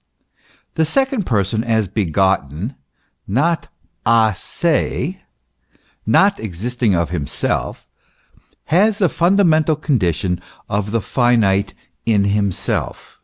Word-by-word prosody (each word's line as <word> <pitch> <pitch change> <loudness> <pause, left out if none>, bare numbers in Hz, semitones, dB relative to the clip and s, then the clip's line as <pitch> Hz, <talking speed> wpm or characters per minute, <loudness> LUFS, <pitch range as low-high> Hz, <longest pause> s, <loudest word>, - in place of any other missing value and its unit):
The 160 - +1
second 265 - 0
Person 110 0 0
as 110 -3 +1
begotten, 95 - 0
as - - -24 0.5
not 160 - 0 0.4
a 110 -1 +4
se, 170 - -1 0.9
not 200 0 +4
existing 110 +2 -1
of 85 -1 -1
himself, 75 -6 -2 0.9
has 205 +4 +4
the 185 -5 +2
funda 190 +6 +2
mental 160 -2 +3
condition 90 - -1 0.3
of 105 0 -2
the 115 +1 0
finite 105 -5 +1 0.3
in 105 -3 +2
himself." 100 -2 -2
110 Hz, 105 wpm, -19 LUFS, 95-160 Hz, 0.9 s, a